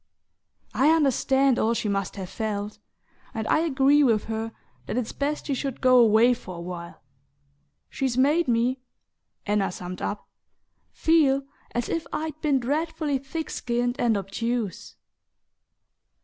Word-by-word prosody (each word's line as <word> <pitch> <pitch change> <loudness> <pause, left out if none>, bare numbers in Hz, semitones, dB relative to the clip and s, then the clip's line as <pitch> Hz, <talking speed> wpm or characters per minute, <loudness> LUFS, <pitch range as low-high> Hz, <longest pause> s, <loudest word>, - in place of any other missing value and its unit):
I 275 +3 +4
understand 270 -4 +3
all 230 +2 +2
she 220 - -2
must 195 -2 -2
have 190 -2 -5
felt, 210 0 -4 0.6
and 220 -1 -3
I - - +3
agree 290 -2 +3
with 225 -5 +3
her 225 0 -4 0.4
that - - -3
it's 245 -3 -2
best 290 +2 -2
she 285 - -1
should 270 -1 -3
go 255 -1 +5
away 230 +1 +5
for 185 -6 -8
a - - -8
while. 170 -2 -8 0.8
She's 265 -4 -2
made 295 +5 +3
me," 245 +2 +1 0.7
Anna 205 -2 +1
summed 180 0 -7
up, 205 - -4 0.6
"feel 285 -4 +3 0.3
as 240 -1 -1
if 330 - -2
I'd 310 0 -4
been 285 -3 +2
dreadfully 295 +2 -1
thick 310 +4 -5
skinned 245 +2 -1
and 230 -5 +2
obtuse!" 210 +1 -3
245 Hz, 140 wpm, -25 LUFS, 220-280 Hz, 0.8 s, go